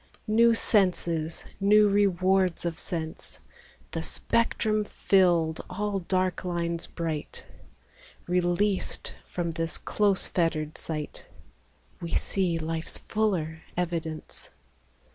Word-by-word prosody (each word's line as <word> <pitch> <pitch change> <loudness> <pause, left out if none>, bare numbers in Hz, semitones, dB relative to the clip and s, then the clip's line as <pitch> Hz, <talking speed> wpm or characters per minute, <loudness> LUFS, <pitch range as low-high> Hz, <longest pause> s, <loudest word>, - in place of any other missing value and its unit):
New 230 +1 +5
senses, 170 -7 +1
new 210 +1 +6
rewards 190 -3 +2
of 170 -1 -2
sense, 165 -1 -4 0.5
The - - -2
spectrum 215 -2 +1
filled, 175 -6 +2
all 200 +1 -1
dark 185 0 0
lines 170 -1 -2
bright. 160 -3 -4 0.8
Released 180 +3 +1 0.2
from 170 -2 -2
this 165 0 -2
close 200 -2 +2
fettered 155 -3 0
sight, 155 -2 -4 0.7
We 170 - -3
see 180 -4 +1
life's 160 0 -3
fuller 175 -7 -1 0.2
evidence. 165 -3 -3
175 Hz, 95 wpm, -28 LUFS, 165-200 Hz, 0.8 s, new